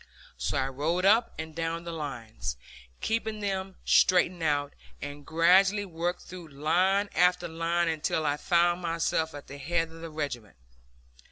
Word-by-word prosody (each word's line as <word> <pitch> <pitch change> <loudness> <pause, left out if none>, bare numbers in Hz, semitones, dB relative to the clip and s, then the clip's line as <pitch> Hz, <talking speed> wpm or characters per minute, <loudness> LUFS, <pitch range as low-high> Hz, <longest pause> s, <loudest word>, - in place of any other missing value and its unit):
So - - -2
I 130 - +1
rode 155 +7 -1
up 225 +4 +5
and 160 0 -6
down 165 +1 -3
the 170 - -5
lines, 115 - -5 0.4
keeping 220 -1 -1
them 195 -2 -3
straightened 180 -1 +4
out, 145 -2 0 0.3
and 145 0 -7
gradually 190 +5 +4
worked 175 0 -3
through 180 -2 -10
line 180 +8 +2
after 180 +1 +3
line 165 +1 0
until 160 0 -1
I 145 0 +1
found 175 +2 +2
myself 165 -2 -1
at 145 - -9
the 140 +1 -10
head 165 +3 -1
of 165 0 -12
the 165 - -6
regiment. 130 - -5
165 Hz, 155 wpm, -28 LUFS, 150-180 Hz, 0.4 s, up